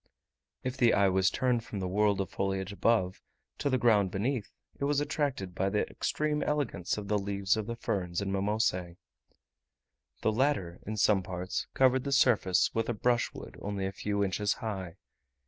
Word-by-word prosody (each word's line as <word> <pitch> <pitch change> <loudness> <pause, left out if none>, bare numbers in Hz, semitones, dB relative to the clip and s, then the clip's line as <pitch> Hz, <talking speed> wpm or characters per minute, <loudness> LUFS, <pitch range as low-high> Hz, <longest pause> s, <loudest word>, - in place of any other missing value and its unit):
If 130 +1 -3
the 120 -3 +4
eye 100 -1 +4
was 95 0 +3
turned 125 -3 0
from 105 -3 -6
the 95 - -2
world 100 +1 +2
of 95 - -5
foliage 95 0 -2
above, 100 -3 +1 0.4
to 140 - 0
the 130 - +2
ground 105 -5 +4
beneath, 110 +4 -2 0.3
it 140 - 0
was 145 0 +2
attracted 145 - -2
by 95 +2 0
the 105 +1 0
extreme 150 0 -1
elegance 145 - -1
of 105 -1 -5
the 105 0 +1
leaves 100 0 0
of 110 -1 -3
the 115 - -3
ferns 90 -6 -2
and 95 -1 -2
mimosae. 95 -3 0 1.2
The 110 - +2
latter, 110 -8 0
in 110 +1 -3
some 100 -1 +4
parts, 90 0 -4
covered 130 -1 +4
the 140 - -3
surface 115 -9 +3
with 115 +1 -1
a 120 - 0
brushwood 120 +2 -1
only 100 -1 -3
a 95 - -2
few 100 +1 -1
inches 100 +1 0
high. 95 -7 -5
105 Hz, 180 wpm, -30 LUFS, 95-120 Hz, 1.2 s, the